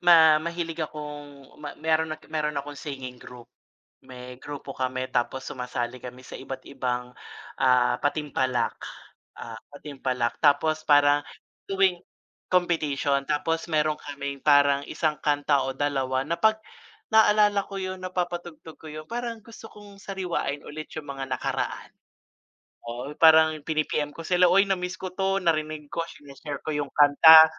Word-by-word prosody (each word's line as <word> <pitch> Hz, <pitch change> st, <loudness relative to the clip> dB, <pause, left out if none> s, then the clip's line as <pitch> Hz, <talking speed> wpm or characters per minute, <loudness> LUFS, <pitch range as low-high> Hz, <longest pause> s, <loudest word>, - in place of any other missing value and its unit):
ma 160 Hz, -3 st, +7 dB
mahilig 170 Hz, 0 st, -4 dB
akong 145 Hz, -2 st, -7 dB
me 150 Hz, -1 st, -6 dB
meron 160 Hz, 0 st, 0 dB
at 155 Hz, -, -24 dB
meron 150 Hz, -1 st, -1 dB
akong 145 Hz, +1 st, -5 dB
singing 130 Hz, -4 st, -7 dB
group. 125 Hz, -1 st, -12 dB, 0.6 s
May 125 Hz, 0 st, -10 dB
grupo 140 Hz, 0 st, -8 dB
kami, 130 Hz, 0 st, -2 dB
tapos 130 Hz, +2 st, -1 dB
sumasali 125 Hz, -1 st, -4 dB
kami 125 Hz, 0 st, -9 dB
sa -, -, -8 dB
iba't 135 Hz, 0 st, -7 dB
ibang, 125 Hz, -2 st, -3 dB, 0.4 s
ah, 125 Hz, -2 st, +3 dB
patimpalak, 130 Hz, -5 st, -1 dB, 0.6 s
ah, 115 Hz, -1 st, -7 dB, 0.2 s
patimpalak 130 Hz, -4 st, -3 dB
tapos 155 Hz, +2 st, +3 dB
para 145 Hz, 0 st, +5 dB, 0.5 s
tuwing 190 Hz, -2 st, +3 dB, 0.5 s
competition. 150 Hz, -6 st, +1 dB
Tapos 165 Hz, +3 st, -1 dB
meron 155 Hz, 0 st, +2 dB
kaming 140 Hz, -1 st, -6 dB
parang 145 Hz, -1 st, +5 dB
isang 155 Hz, -2 st, 0 dB
kanta 145 Hz, -1 st, +2 dB
o 135 Hz, -, -2 dB
dalawa 135 Hz, -2 st, 0 dB
na 170 Hz, -, 0 dB
'pag 220 Hz, 0 st, +3 dB, 0.5 s
naalala 210 Hz, -2 st, +4 dB
ko 195 Hz, -1 st, -7 dB
'yun, 185 Hz, 0 st, -5 dB
napapatugtog 175 Hz, -3 st, -4 dB
ko -, -, -16 dB
'yun, 155 Hz, 0 st, -8 dB
parang 235 Hz, -1 st, -4 dB
gusto 225 Hz, 0 st, -13 dB
kong 205 Hz, -1 st, -14 dB
sariwain 180 Hz, -7 st, -3 dB
ulit 155 Hz, +1 st, -8 dB
'yung 155 Hz, -2 st, -6 dB
mga 135 Hz, -1 st, -5 dB
nakaraan. 130 Hz, -, -3 dB, 0.9 s
Oo, 120 Hz, +5 st, -6 dB
parang 160 Hz, 0 st, +6 dB
pini-PM 155 Hz, -1 st, -1 dB
ko 165 Hz, +2 st, -10 dB
sila, 180 Hz, 0 st, +4 dB
"uy 195 Hz, +2 st, +5 dB
na 195 Hz, -, +3 dB
miss 180 Hz, 0 st, -5 dB
ko 185 Hz, -1 st, -6 dB
'to," 195 Hz, 0 st, 0 dB
narinig 155 Hz, -4 st, -1 dB
ko, 170 Hz, -, -1 dB
sine-share 145 Hz, 0 st, -8 dB
ko 155 Hz, -, -2 dB
'yung 145 Hz, -1 st, -2 dB
kanta, 160 Hz, +2 st, +9 dB
150 Hz, 145 wpm, -26 LUFS, 140-170 Hz, 0.9 s, kanta